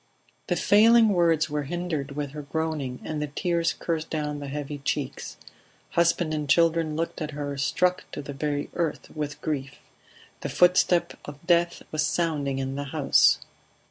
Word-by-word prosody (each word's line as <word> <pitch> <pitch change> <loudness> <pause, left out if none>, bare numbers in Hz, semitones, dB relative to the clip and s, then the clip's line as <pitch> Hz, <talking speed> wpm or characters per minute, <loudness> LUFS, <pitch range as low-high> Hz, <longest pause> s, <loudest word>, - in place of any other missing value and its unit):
The 180 - +1
failing 220 +5 +6
words 170 -5 +3
were 150 -1 -2
hindered 155 -2 -3
with 145 -1 -4
her 150 +1 -6
groaning, 145 -3 -3
and 150 -2 -4
tears 170 -2 +1
coursed 165 -2 -3
down 150 -2 -3
the 145 - -6
heavy 145 +1 -5
cheeks. 140 -1 -3 0.5
Husband 170 -1 +2
and 150 -2 -3
children 165 -1 +3
looked 165 +1 -3
at 155 - -2
her, 145 -1 -3
struck 180 +6 +1
to 145 - -5
the 140 - -7
very 145 +1 -2
earth 165 -4 -3
with 150 -1 -4
grief. 140 -4 -3 0.6
The - - -4
footstep 180 0 +3
of 145 +2 -10
death 170 0 +2
was 155 0 0
sounding 150 -4 0
in 135 0 -2
the 140 +1 -4
house. 140 0 +4
155 Hz, 160 wpm, -26 LUFS, 145-170 Hz, 0.6 s, failing